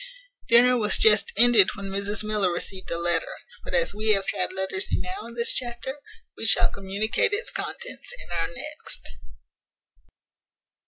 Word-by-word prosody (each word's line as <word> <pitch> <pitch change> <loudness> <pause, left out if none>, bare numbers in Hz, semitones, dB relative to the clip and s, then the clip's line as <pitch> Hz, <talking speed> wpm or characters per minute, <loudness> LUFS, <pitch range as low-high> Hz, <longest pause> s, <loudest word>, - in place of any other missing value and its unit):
Dinner 250 +1 +5
was 210 -1 +3
just 445 +2 +4
ended 235 -5 +6
when 200 - -8
Mrs 200 +2 -1
Miller 210 -4 0
received 185 +2 -3
a 170 - -2
letter; 170 -1 0 0.3
but - - -4
as 170 +2 +2
we 215 +1 +2
have 195 -1 0
had 185 - 0
letters 190 - -3
enow 375 - -3
in 235 - -12
this 235 0 +1
chapter, 250 +3 -4 0.4
we - - -9
shall - - +4
communicate 200 - -1
its 425 +4 -1
contents 485 0 -5
in - - -9
our 165 -1 0
next. - - -4
210 Hz, 155 wpm, -25 LUFS, 190-245 Hz, 0.4 s, ended